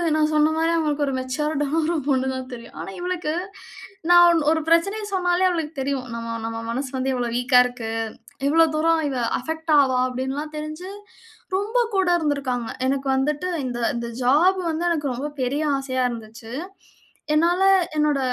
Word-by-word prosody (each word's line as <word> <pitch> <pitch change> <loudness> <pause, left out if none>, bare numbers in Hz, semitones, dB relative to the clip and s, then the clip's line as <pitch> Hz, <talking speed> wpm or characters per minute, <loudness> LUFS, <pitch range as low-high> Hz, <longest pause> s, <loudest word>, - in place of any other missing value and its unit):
நான் 310 0 +2
சொன்ன 305 +1 +4
மாரி 325 +1 +2
அவங்களுக்கு 300 -3 0
ஒரு 275 - -1
மேச்சர்ட்டான 290 +3 -2
ஒரு 335 +2 0
பொண்ணு 265 -1 +2
தான் 260 0 -6
தெரியும். 235 -1 -10
ஆனா 170 - -6
இவளுக்கு 355 -3 -2 0.8
நான் 350 0 +8
ஒண் 335 -1 +3
ஒரு 320 0 +1
பிரச்சனைய 395 +6 +2
சொன்னாலே 360 0 +2
அவளுக்கு 325 -3 -2
தெரியும். 265 -2 -2
நம் 230 0 -5
நம்ம 225 0 -4
மனசு 260 +3 -2
வந்து 265 +1 0
இவ்வளோ 245 -2 -1
வீக்கா 250 0 +4
இருக்கு. 245 -3 -5 0.6
இவ்வளோ 325 +3 +5
தூரம் 325 +1 +2
இவ 265 - -3 0.2
அபெக்ட் 320 +4 -2
ஆவா 260 -2 +3
அப்டின்லாம் 265 +4 -4
தெரிஞ்சு 310 +5 -6 0.6
ரொம்ப 420 +5 -1 0.2
கூட 380 -1 +2
இருந்துக்காங்க. 275 -6 -1 0.2
எனக்கு 270 0 -1
வந்துட்டு 295 +6 0 0.2
இந்த 245 -1 -3 0.2
இந்த 235 0 -3 0.2
ஜாப் 330 +10 +4
வந்து 320 +2 -2
எனக்கு 300 -4 -1
ரொம்ப 270 +4 -3 0.2
பெரிய 280 +5 -1
ஆசையா 260 -1 -1
இருந்துச்சு. 225 0 -9 0.8
என்னால 340 +4 +3 0.3
என்னோட 300 -2 +2
295 Hz, 160 wpm, -23 LUFS, 255-325 Hz, 0.8 s, நான்